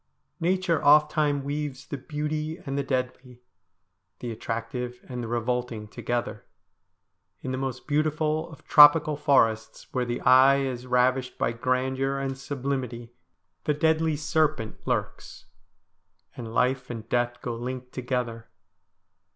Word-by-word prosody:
Nature 175 -2 +1
ofttimes 150 -1 +4
weaves 140 -1 -4
the 145 - -5
beautiful 150 +3 -4
and 135 -1 -3
the 140 - +1
deadly, 125 -2 -3 0.8
the 120 - -5
attractive 115 +2 -4
and 125 -1 -5
the - - -4
revolting 120 -1 -2
together. 120 +2 -3 1.0
In 130 - -4
the 130 - -2
most 130 -2 -4
beautiful 155 +1 0
of 160 - -14
tropical 150 0 +7
forests, 130 -7 +1
where 125 - 0
the 120 0 -3
eye 130 +2 +6
is 130 -2 -4
ravished 125 +1 +1
by - - 0
grandeur 130 +3 -1
and 135 -1 -2
sublimity, 130 -3 -4 0.5
the 150 - +1
deadly 160 +1 +2
serpent 150 -6 0
lurks, - - -3 0.9
and 115 -2 -7
life 125 +2 +1
and 115 -2 -6
death 120 0 0
go 120 - -4
linked 125 +1 -6
together. 125 -3 -3
130 Hz, 125 wpm, -26 LUFS, 120-145 Hz, 1.0 s, tropical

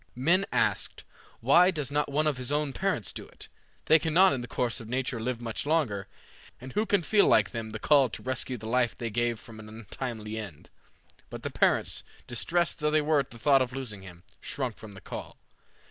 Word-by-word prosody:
Men 175 +10 +2
asked, - - 0 0.4
"Why 170 +10 +6
does 150 -7 -2
not 150 0 0
one 150 +2 +1
of 150 -4 +1
his 125 +1 -3 0.2
parents 190 - -1
do - - -8
it? - - -9 0.4
They 160 - +6
cannot 175 +5 +4
in 130 - -2
the 120 - -6
course 120 -2 -1
of 110 - -10
nature 125 -1 -2
live 120 +1 -2
much 115 -2 -3
longer, 140 -11 0 0.5
and 130 +1 -9
who 215 +1 0
can 200 -4 +2
feel 205 +4 +4
like - - +4
them 115 -2 -5
the 110 - -5
call 135 +2 +4
to - - -7
rescue 130 0 -2
the 110 - -10
life 120 0 +1
they 115 -2 -4
gave 120 0 0
from 110 -1 -12
an 110 0 -10
untimely 110 0 -6
end?" 100 -9 -9 0.6
But - - -8
the - - -3
parents, - - +1 0.2
distressed 170 +9 0
though 150 0 +1
they 155 0 +3
were 150 0 +3
at 135 - -2
the 115 - -12
thought 135 +2 +4
of 125 0 -1
losing 120 -7 -4
him, 90 -2 -12 0.2
shrunk 130 -5 -3
from 110 -2 -10
the 95 - -12
call. - - -8
125 Hz, 210 wpm, -28 LUFS, 115-150 Hz, 0.6 s, Why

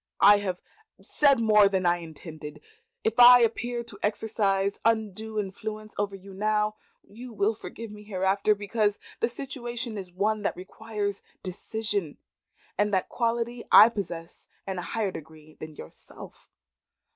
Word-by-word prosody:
"I 205 +1 +8
have 185 -3 -3 0.4
said 280 -4 +3
more 210 -3 +5
than 190 -2 0
I 175 0 +3
intended. 160 -2 -10 0.4
If 225 +2 -1
I 245 0 +10
appear 235 +1 0
to 230 -4 -14
exercise 200 -2 0
undue 220 -1 0
influence 215 +2 -6
over 200 -1 -2
you 195 0 -12
now, 210 +1 0 0.3
you 240 +4 -10
will 215 0 +1
forgive 225 0 -9
me 210 0 -11
hereafter, 200 +1 +1
because 205 0 0 0.2
the 230 - +1
situation 240 -3 -5
is 185 -2 -8
one 210 +4 0
that 205 - -2
requires 205 +1 -5 0.2
decision, 200 -2 -4 0.6
and 205 0 +2
that 190 -2 0
quality 235 0 -1
I 220 - +10
possess 175 -6 -7 0.2
in 190 -2 -3
a - - -3
higher 210 +2 -2
degree 155 -1 -12
than 155 -1 -8
yourself. 80 - -13
210 Hz, 145 wpm, -27 LUFS, 190-225 Hz, 0.6 s, I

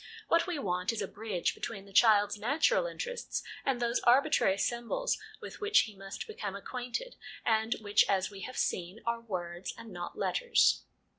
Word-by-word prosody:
What 335 +1 +4
we 355 -3 -2
want 180 -7 0
is 225 -3 -3
a - - -3
bridge 205 -4 -2
between 200 -4 -6
the 200 - -16
child's 205 -1 +5
natural 290 - +2
interests - - -4 0.2
and 270 -3 0
those 235 0 +1
arbitrary 250 -5 +4
symbols 240 - 0 0.3
with - - -9
which 420 +1 +5
he 215 -2 -6
must 195 - -7
become 210 - -5
acquainted, 250 - -5 0.3
and 220 0 +2
which, 205 0 +4
as 190 0 +1
we 200 - -9
have 255 +6 -7
seen, 180 +5 -1
are 235 0 -1
words, 175 -5 -5
and 230 -1 -10
not 175 -1 -6
letters. 485 -1 +3
225 Hz, 170 wpm, -31 LUFS, 195-275 Hz, 0.3 s, child's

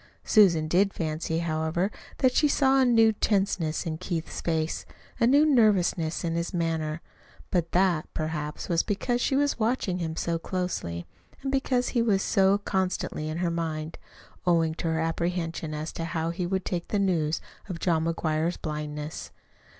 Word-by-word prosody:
Susan 170 -8 +5
did 195 +5 +3
fancy, 160 0 -2
however, 165 +3 0 0.3
that 260 -2 +3
she 300 - +4
saw 270 -1 +3
a - - +5
new 225 -2 +5
tenseness 195 -6 0
in 160 -1 -3
Keith's 165 -3 -4
face, 160 -1 -1 0.4
a 230 - +4
new 285 +4 +5
nervousness 195 - +3
in 165 -1 -1
his 170 +2 -2
manner; 165 -2 -1 0.5
but 170 -2 0
that, 180 -4 +2
perhaps, 150 -1 -3
was 170 -1 +2
because 240 +4 -1
she 265 - +1
was 285 -2 +1
watching 215 -5 0
him 160 -2 -3
so 165 0 -1
closely, 165 - -3 0.4
and 270 - -1
because 265 -2 +1
he 240 - +1
was 205 -4 +2
so 195 -1 +3
constantly 185 -5 -2
in 155 - -3
her 175 -1 0
mind, 160 -1 -3 0.5
owing 165 -2 +3
to 165 - -4
her 160 0 0
apprehension 165 -1 -2
as 155 +1 -4
to 165 - -5
how 165 -1 -2
he 175 +1 -3
would 190 +1 -1
take 175 -2 -3
the 210 - -1
news 165 -6 +1 0.3
of 180 - -3
John 165 -2 +1
McGuire's 165 0 0
blindness. 150 0 -5
170 Hz, 165 wpm, -27 LUFS, 160-200 Hz, 0.5 s, Susan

